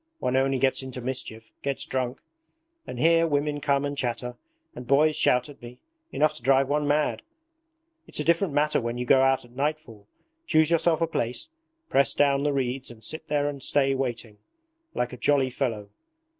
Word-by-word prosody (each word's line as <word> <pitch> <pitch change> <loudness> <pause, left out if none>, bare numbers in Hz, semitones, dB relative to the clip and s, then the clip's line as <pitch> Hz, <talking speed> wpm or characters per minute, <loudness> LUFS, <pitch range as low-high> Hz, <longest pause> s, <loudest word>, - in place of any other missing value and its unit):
One 125 - -1
only 135 0 +2
gets 130 +1 +1
into 130 -1 -7
mischief, 120 -3 -6
gets 140 -1 -2
drunk. 130 -1 -3 0.7
And - - -6
here 165 +4 +4
women 145 -1 -1
come 140 0 +1
and 145 0 -3
chatter, 125 -2 -3 0.4
and 125 -1 -9
boys 150 +4 +4
shout 125 -2 +2
at 145 -2 -14
me 120 +1 -11 0.3
enough 155 0 +2
to - - -12
drive 135 +2 +3
one 145 +1 0
mad. 150 +1 +1 0.9
It's - - -5
a - - 0
different 170 +2 +2
matter 150 -1 +2
when 120 +1 -3
you 125 - -3
go 130 +2 +5
out 135 -1 +2
at 120 - -19
nightfall, 140 -7 -4 0.4
choose 155 0 +3
yourself 165 0 +2
a 165 - +2
place, 125 - -3 0.4
press 140 - +2
down 140 -1 +3
the 145 +1 +1
reeds 130 -1 -2
and 110 -2 -13
sit 155 +6 -5
there 145 -2 0
and 140 -2 -5
stay 135 +1 +2
waiting, 120 -5 -4 0.6
like 125 +1 -2
a - - -7
jolly 135 -1 +2
fellow. 115 -6 -3
135 Hz, 185 wpm, -26 LUFS, 125-145 Hz, 0.9 s, go